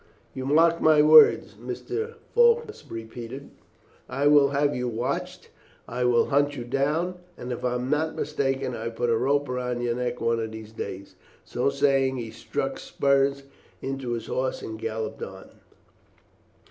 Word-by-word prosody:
"You 130 0 -5
mark 165 +3 +4
my 155 -1 +5
words," 155 0 +7
Mr. 450 +1 -5 0.2
Faulkner 470 -2 +4 0.2
repeated. 115 +4 -8 0.6
"I 140 +2 -1
will 145 -1 +6
have 145 +1 +1
you 125 0 -2
watched, 120 +1 -4 0.4
and 120 - -8
I 125 - +2
will 120 -1 +3
hunt 145 0 +2
you 120 - -4
down, 150 +8 -1 0.2
and 125 - -6
if 120 - -5
I 125 -1 0
am 125 +1 -3
not 155 +1 0
mistaken 135 -3 -1
I - - -6
will 115 - -4
put 120 +1 0
a - - +3
rope 140 +5 +1
round 125 -1 -3
your 120 -1 0
neck 125 0 -3
one 115 0 +1
of 110 -1 -3
these 110 -1 -9
days." 100 -3 -7 0.3
So 125 - 0
saying, 135 -1 +2
he 115 -2 -5
struck - - -4
spurs 140 0 +1 0.4
into 135 -2 -4
his 115 - -4
horse 130 0 -2
and 110 0 -6
galloped 110 0 -4
on. - - -8
130 Hz, 170 wpm, -26 LUFS, 120-145 Hz, 0.6 s, words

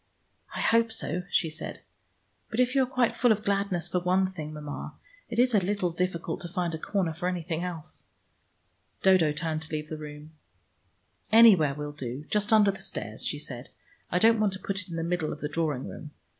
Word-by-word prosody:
I - - -2
hope 230 0 +3
so," 180 -5 -2
she 165 - +2
said. 155 - -6 0.7
"But 225 - -3
if 250 0 +3
you 275 - +4
are - - +3
quite 255 -2 +1
full 245 -1 +4
of 210 -1 +1
gladness 195 -4 0
for 180 +1 0
one 185 +1 +2
thing, 155 -5 -6
Mama, 150 -1 -7 0.3
it 230 - -4
is 250 +1 +4
a 210 - +6
little 185 -1 0
difficult 170 -1 -2
to 175 - -4
find 175 -1 -2
a 160 - -4
corner 185 -3 -1
for 175 +3 -3
anything 170 -2 -2
else." 170 -4 -6 1.0
Dodo 185 -5 +5
turned 155 +1 -2
to 160 - -9
leave 155 0 -3
the 155 - -4
room. 150 0 -9 1.0
"Anywhere 200 -11 +7
will 150 0 -5
do. 135 0 -5
Just 210 0 +1
under 210 -2 +6
the 195 - -10
stairs," 110 - -5
she - - -1
said. 130 -4 -8 0.4
"I 180 - +2
don't 225 +4 +5
want 210 -3 +2
to 190 - -6
put 195 +1 -3
it 185 - -11
in 170 - -5
the 165 - -2
middle 170 -2 -1
of 150 - -6
the 150 - -2
drawing 150 -3 -1
room. 150 - -8
175 Hz, 210 wpm, -28 LUFS, 155-200 Hz, 1.0 s, Anywhere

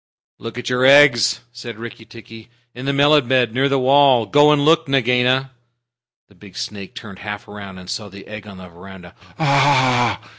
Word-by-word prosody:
"Look 115 +1 -9
at 125 - -7
your 125 0 -1
eggs," 135 -4 +4
said 120 -2 -10
Rikki 115 0 -10
tikki, 115 0 -15 0.2
"in 125 +3 -9
the - - +1
melon 145 -1 +2
bed 125 -3 +1
near 135 +3 0
the 140 - 0
wall. 135 -2 +3
Go 145 +7 +3
and 145 -1 +1
look, 165 0 +2
Nagaina!" 130 0 0 0.8
The - - -24
big 100 0 -16
snake 100 -2 -8
turned 100 -4 -11
half 105 +1 -8
around, 100 -2 -11
and 90 -1 -13
saw 105 +2 -6
the 100 0 -14
egg 105 0 -11
on 100 -2 -12
the 95 0 -12
veranda. 90 0 -14 0.2
"Ah 130 - +1
h! - - -21
120 Hz, 190 wpm, -18 LUFS, 105-135 Hz, 0.8 s, eggs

